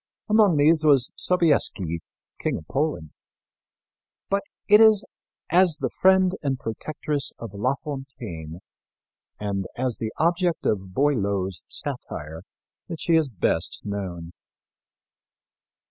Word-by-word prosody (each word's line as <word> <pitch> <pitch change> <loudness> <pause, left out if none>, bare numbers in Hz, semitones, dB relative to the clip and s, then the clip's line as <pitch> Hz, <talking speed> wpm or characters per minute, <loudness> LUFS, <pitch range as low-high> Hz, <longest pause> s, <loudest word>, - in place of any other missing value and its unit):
Among 210 -6 +4
these 155 +2 +4
was 140 -5 +4
Sobieski, 140 - +1 0.4
King - - -1
of 80 - -10
Poland. 140 - -2 1.2
But 200 0 +2 0.3
it 210 +1 +7
is 220 -2 +6 0.5
as 175 -3 +4
the - - -2
friend 190 -1 +4
and 135 -3 -1
protectress 145 +5 -3
of 115 -4 -8
La 125 +7 0
Fontaine 115 - -7 0.8
and 100 -2 -2
as 125 -1 -2
the 110 -1 -3
object 170 +1 +1
of 95 -3 -1
Boileau's 100 - 0
satire 80 +2 -6 0.5
that 165 -4 -6
she 170 - 0
is 160 -3 +3
best 85 -6 -1
known. 90 -5 -5
135 Hz, 115 wpm, -24 LUFS, -, 1.2 s, it